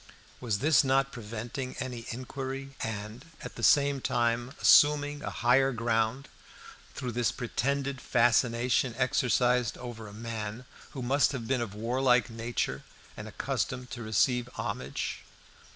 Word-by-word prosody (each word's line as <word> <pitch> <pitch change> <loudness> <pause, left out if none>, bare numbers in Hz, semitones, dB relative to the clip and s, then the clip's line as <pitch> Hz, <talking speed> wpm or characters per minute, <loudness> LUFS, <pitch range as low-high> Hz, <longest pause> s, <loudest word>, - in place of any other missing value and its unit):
Was 115 -5 -1
this 155 -1 +5
not 135 0 +2
preventing 115 +3 -6
any 125 -3 -5
inquiry, 135 +2 -5
and, 110 +3 -5 0.2
at - - -7
the - - -9
same 140 -1 +4
time, 120 -1 0
assuming 145 0 +5
a - - -4
higher 135 +3 +3
ground 115 +2 0 0.7
through 125 - -4
this 120 -1 +1
pretended 135 +2 -2
fascination 120 +1 +2
exercised 125 -2 +2
over 120 -3 -8
a - - -10
man 110 +1 -6 0.3
who 130 - -5
must 140 +4 +2
have 120 -4 -5
been 130 -1 +1
of 105 -4 -5
warlike 125 +1 +2
nature 115 +1 -2 0.3
and - - -8
accustomed 125 0 -3
to 120 - -6
receive 120 +3 +1
homage? 65 +2 -4
125 Hz, 135 wpm, -29 LUFS, 115-135 Hz, 0.7 s, this